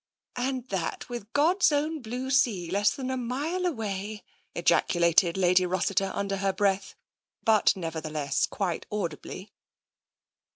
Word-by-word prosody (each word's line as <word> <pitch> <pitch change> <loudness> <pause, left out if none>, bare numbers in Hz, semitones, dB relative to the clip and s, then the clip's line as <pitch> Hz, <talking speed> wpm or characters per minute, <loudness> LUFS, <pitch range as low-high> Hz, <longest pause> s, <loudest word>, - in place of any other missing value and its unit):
" - - -66
And 255 0 -2
that 190 +4 -3
with 235 -3 -7
God's 330 +4 +4
own 300 +1 0
blue 250 +3 -4
sea 210 -11 +2
less 205 +2 +3
than 260 -1 -4
a 260 - -1
mile 290 +10 -2
away! 210 - -4 0.2
" - - -41
ejaculated 170 0 +3
Lady 185 0 +4
Rossiter 185 +2 0
under 200 0 -1
her 195 0 +1
breath, 195 0 0 0.5
but 220 -2 +4
nevertheless 155 -5 -2
quite 185 -5 -3
audibly. 190 0 -5
205 Hz, 135 wpm, -27 LUFS, 185-255 Hz, 0.5 s, God's